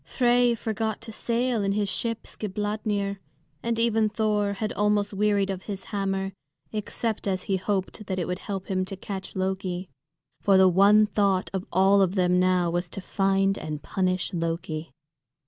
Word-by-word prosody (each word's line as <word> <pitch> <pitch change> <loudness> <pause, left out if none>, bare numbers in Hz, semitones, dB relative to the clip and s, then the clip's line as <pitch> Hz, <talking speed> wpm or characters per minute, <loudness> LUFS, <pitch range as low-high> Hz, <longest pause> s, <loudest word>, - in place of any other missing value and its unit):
Frey 245 -1 +3
forgot 220 -1 -2
to 230 -1 -8
sail 235 0 0
in 195 0 +1
his 205 0 0
ship 230 +2 -2
Skidbladnir, 205 -1 -2 0.4
and 230 -1 -1
even 225 -2 +2
Thor 210 -2 +1
had 215 +2 -3
almost 210 0 +1
wearied 200 -1 +2
of 190 -1 -4
his 195 -2 -4
hammer, 195 -1 -1 0.4
except 215 0 -2
as 185 -1 0
he 195 - 0
hoped 195 +2 -2
that 185 - -2
it 175 - -1
would 180 +2 -3
help 195 -2 -5
him 185 -1 0
to 195 - -5
catch 190 -1 -6
Loki. 185 -2 -2 0.5
For 195 -1 +5
the 190 0 +7
one 200 +4 +6
thought 200 -3 +1
of 190 -1 -3
all 195 +2 +5
of 190 0 +2
them 180 -1 +3
now 180 -2 +2
was 175 +1 -1
to 195 - -6
find 195 +1 +1
and 155 -1 -5
punish 185 0 -1
Loki. 165 -1 -3
195 Hz, 170 wpm, -26 LUFS, 185-210 Hz, 0.5 s, the